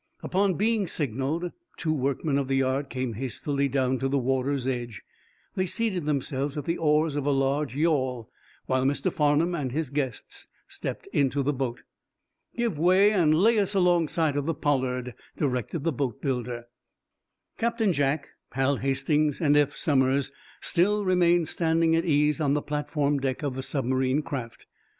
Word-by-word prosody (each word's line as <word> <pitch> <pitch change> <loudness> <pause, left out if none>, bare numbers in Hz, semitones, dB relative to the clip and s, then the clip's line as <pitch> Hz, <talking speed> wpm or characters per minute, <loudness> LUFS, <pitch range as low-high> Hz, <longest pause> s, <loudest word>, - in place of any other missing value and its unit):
Upon 190 0 +1
being 215 0 +1
signaled 145 +5 -1 0.3
two 155 -2 -1
workmen 140 +1 0
of 135 - -2
the 135 - 0
yard 135 +1 0
came 130 -3 -3
hastily 140 +4 -2
down 130 -1 0
to 135 - 0
the 140 +1 +1
water's 135 +1 0
edge. 120 -5 -4 0.5
They 185 0 -1
seated 190 -5 -1
themselves 140 0 -1
at 145 - -4
the 170 - -1
oars 155 -1 +2
of 145 - -1
a - - +3
large 135 -1 0
yawl, 130 -7 0 0.4
while 130 0 +1
Mr. 145 +7 0
Farnum 150 +4 +2
and 145 -7 -2
his 150 0 -2
guests 140 -4 -4 0.2
stepped - - -5
into 140 0 +1
the 145 +2 +1
boat. 125 -3 -3 0.8
"Give 230 -10 -1
way, 185 +5 +5
and 165 -7 +3
lay 215 +6 +4
us 200 0 0
alongside 170 -4 +2
of 145 +1 -1
the 165 - 0
'Pollard,'" 125 -4 -1 0.2
directed 140 +2 -2
the 165 -1 0
boatbuilder. 125 -2 -3 1.0
Captain 230 -4 +1
Jack, 145 0 0 0.2
Hal 135 +2 +1
Hastings 140 +3 +1
and 145 -3 +3
Eph 145 0 +3
Somers 135 -2 +2 0.3
still 205 +4 +2
remained 175 -2 +3
standing 165 0 +2
at 165 - +1
ease 150 -1 +2
on 145 -1 +2
the 150 - -1
platform 145 -1 -1
deck 135 +1 -2
of 140 -3 -1
the 130 - -4
submarine 130 +1 0
craft. 130 -8 -6
145 Hz, 160 wpm, -26 LUFS, 130-165 Hz, 1.0 s, way